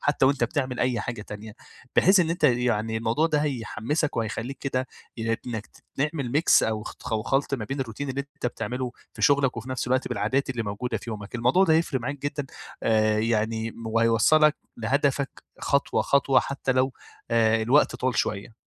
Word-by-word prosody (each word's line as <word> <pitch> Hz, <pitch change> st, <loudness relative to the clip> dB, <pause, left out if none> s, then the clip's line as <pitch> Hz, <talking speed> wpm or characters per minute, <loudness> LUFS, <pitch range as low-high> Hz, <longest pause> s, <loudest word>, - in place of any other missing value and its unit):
حتى 145 Hz, -2 st, +2 dB
وأنت 135 Hz, -2 st, +2 dB
بتعمل 130 Hz, 0 st, -2 dB
أي 125 Hz, -3 st, +1 dB
حاجة 120 Hz, -2 st, -5 dB
تانية 105 Hz, +1 st, -9 dB, 0.4 s
بحيث 190 Hz, +1 st, +6 dB
إن 165 Hz, -, +1 dB
أنت 170 Hz, -1 st, -2 dB
يعني 120 Hz, -4 st, +2 dB
الموضوع 115 Hz, +8 st, +1 dB
ده 155 Hz, -2 st, +1 dB
هيحمّسك 145 Hz, +2 st, -2 dB
وهيخلّيك 115 Hz, +4 st, -3 dB
كده 130 Hz, -2 st, -2 dB, 0.3 s
ي 115 Hz, 0 st, -1 dB
إنّك 110 Hz, -3 st, -4 dB, 0.3 s
تعمل 140 Hz, -3 st, -1 dB
Mix 165 Hz, -, +5 dB
أو 110 Hz, -1 st, -1 dB
أتخ 115 Hz, -, -8 dB
أو 110 Hz, -1 st, 0 dB
خلط 135 Hz, +3 st, 0 dB
ما 115 Hz, -5 st, -4 dB
بين 135 Hz, +5 st, -4 dB
الروتين 135 Hz, +3 st, -4 dB
اللي 135 Hz, +1 st, -2 dB
أنت 140 Hz, -2 st, -6 dB
بتعمله 125 Hz, 0 st, -3 dB, 0.2 s
في -, -, -7 dB
شغلك 140 Hz, -3 st, +3 dB
وفي 120 Hz, +3 st, -6 dB
نفس 130 Hz, -1 st, -2 dB
الوقت 130 Hz, +1 st, +1 dB
بالعادات 135 Hz, +1 st, 0 dB
اللي 120 Hz, -3 st, -2 dB
موجودة 105 Hz, +4 st, -3 dB
في 115 Hz, -, -8 dB
يومك، 105 Hz, +1 st, -7 dB
الموضوع 125 Hz, +11 st, +3 dB
ده 160 Hz, -4 st, +4 dB
هيفرِق 160 Hz, -5 st, +1 dB
معاك 140 Hz, +4 st, -4 dB
جدًا 145 Hz, 0 st, -3 dB, 0.4 s
آأ 110 Hz, -1 st, +3 dB
يعني 110 Hz, 0 st, 0 dB
م 115 Hz, 0 st, -10 dB
وهيوصّلك 115 Hz, +7 st, +4 dB, 0.2 s
لهدفك 140 Hz, +4 st, -1 dB, 0.2 s
خطوة 140 Hz, -, +1 dB
خطوة 140 Hz, -1 st, +3 dB
حتى 135 Hz, -1 st, -2 dB
لو 130 Hz, +1 st, +1 dB, 0.4 s
آآ 115 Hz, -1 st, +3 dB
الوقت 120 Hz, +1 st, +3 dB
طوّل 130 Hz, -2 st, -1 dB
شويّة. 105 Hz, +2 st, -2 dB
125 Hz, 185 wpm, -26 LUFS, 115-140 Hz, 0.4 s, بحيث